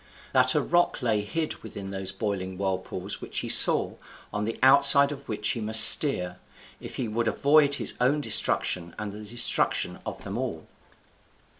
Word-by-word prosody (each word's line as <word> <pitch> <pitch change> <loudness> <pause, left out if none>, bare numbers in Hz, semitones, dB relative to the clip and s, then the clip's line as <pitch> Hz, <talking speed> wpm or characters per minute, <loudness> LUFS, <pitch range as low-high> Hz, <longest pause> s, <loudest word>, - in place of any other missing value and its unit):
That - - +2
a - - 0
rock 175 -5 -1
lay 110 -3 -1
hid 155 +10 -5
within 100 -3 -10
those 95 -1 -5
boiling 95 -4 -6
whirlpools 95 0 -6
which - - -5
he - - -7
saw, - - +6 0.4
on 105 0 -4
the 115 - -5
outside 140 +1 +5
of 140 -1 -11
which 105 -1 -3
he 115 +1 -3
must 110 +1 +4
steer, 90 - +1 0.4
if - - -10
he 125 - -4
would 115 +2 -3
avoid 145 +4 +1
his - - -2
own 135 +4 +1
destruction 85 - +1
and 105 -2 -7
the 105 - -11
destruction 120 +4 0
of - - -9
them 100 +4 -7
all. 115 -12 -6
110 Hz, 170 wpm, -24 LUFS, 100-140 Hz, 0.4 s, saw